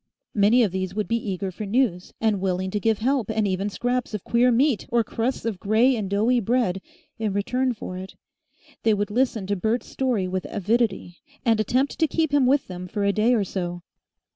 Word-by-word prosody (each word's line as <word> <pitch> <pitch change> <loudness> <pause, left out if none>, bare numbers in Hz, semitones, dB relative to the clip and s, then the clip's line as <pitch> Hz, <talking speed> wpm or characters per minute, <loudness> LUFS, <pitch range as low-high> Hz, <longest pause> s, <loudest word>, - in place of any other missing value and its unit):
Many 215 +4 +4
of 205 - +1
these 185 0 -3
would 210 -1 -1
be 230 -2 -1
eager 190 0 -3
for 210 +3 -6
news, 200 -5 0
and 215 -4 +1
willing 185 0 -1
to 210 - -1
give 220 +1 +1
help 250 -1 0
and 220 -1 +1
even 195 +2 -1
scraps 245 +1 -2
of 210 - -5
queer 245 +1 +3
meat, 255 0 +2
or 235 -1 +2
crusts 230 +4 -2
of 215 -5 -2
grey 225 +7 +3
and 210 -4 -3
doughy 220 +5 +2
bread, 225 -4 0 0.4
in 215 -3 -1
return 250 +6 0
for 185 -3 -6
it. 190 +1 -9 0.7
They 220 -2 +3
would 205 +1 -2
listen 235 -3 0
to 205 +1 -1
Bert's 220 +5 -1
story 245 -8 -1
with 185 0 -3
avidity, 205 -3 -1 0.3
and 225 -2 +3
attempt 255 +6 0
to 320 - +4
keep 315 -1 0
him 280 -3 +4
with 275 +1 +3
them 180 0 -7
for 205 +3 -3
a 200 0 +2
day 225 +4 +3
or 215 - +2
so. 175 -2 -4
215 Hz, 210 wpm, -24 LUFS, 195-245 Hz, 0.7 s, Many